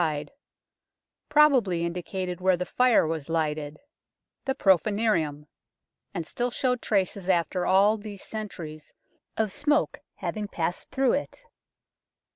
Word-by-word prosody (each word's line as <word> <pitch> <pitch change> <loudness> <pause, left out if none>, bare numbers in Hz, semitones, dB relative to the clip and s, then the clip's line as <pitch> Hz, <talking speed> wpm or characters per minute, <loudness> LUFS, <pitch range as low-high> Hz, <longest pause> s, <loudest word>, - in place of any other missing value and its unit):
wide, 150 -3 -1 1.0
probably 260 - +4
in 170 - -2
dicated 180 0 -4
where 185 -1 +3
the 180 - -2
fire 250 -2 +4
was 160 -2 -3
lighted 155 -2 -1 0.7
the 265 -1 0
Prce 190 - +5
furnium 200 -9 0 0.7
and 170 -4 -4
still 245 +8 -2
showed 250 0 0
traces 195 -2 0
after 180 0 +1
all 200 +3 +5
these 205 -2 -8
centuries 165 -8 -7 0.5
of 220 -2 0
smoke 295 +8 +1 0.2
having 210 -1 -4
passed 175 -2 -3
through 265 -2 +2
it. 290 - -3
190 Hz, 125 wpm, -27 LUFS, 165-220 Hz, 1.0 s, Prce